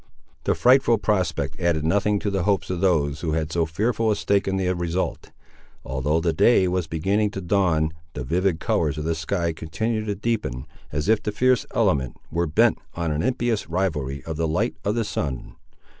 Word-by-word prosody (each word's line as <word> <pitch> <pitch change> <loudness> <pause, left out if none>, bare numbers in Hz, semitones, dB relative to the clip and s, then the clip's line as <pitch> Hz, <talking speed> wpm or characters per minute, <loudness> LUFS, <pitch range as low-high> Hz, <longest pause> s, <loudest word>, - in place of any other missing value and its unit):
The - - +2
frightful 125 -2 +5
prospect 85 -9 -1
added 85 -4 +1
nothing 100 +4 +2
to 100 - -1
the 95 -1 0
hopes 95 -1 0
of 90 -1 -3
those 75 -6 +1
who 80 -3 -1
had 80 0 -1
so 85 -1 +1
fearful 110 +7 0
a 105 - +3
stake 100 +1 +1
in 95 0 0
the 90 -1 +1
result. 85 +1 -2 0.6
Although 65 +4 0
the 85 0 0
day 95 +3 +4
was 90 -2 -1
beginning 95 +7 +1
to 100 - -6
dawn, 85 -4 +1 0.2
the 65 - -4
vivid 85 +5 0
colours 75 -2 0
of 75 - -3
the 80 +1 0
sky 85 +1 -1
continued 110 +8 -3
to 100 - -1
deepen, 100 - -2 0.3
as 75 +3 -2
if 110 0 +3
the 105 - -2
fierce 125 +3 +2
element 65 -3 +1
were 85 +2 0
bent 75 - +3 0.2
on 85 -2 -1
an 75 +1 -1
impious 120 -5 -1
rivalry 75 -7 -2
of 80 -2 -5
the 80 0 0
light 80 - 0
of 105 +4 0
the 115 -2 0
sun. 70 -10 -4
85 Hz, 195 wpm, -24 LUFS, 80-100 Hz, 0.6 s, frightful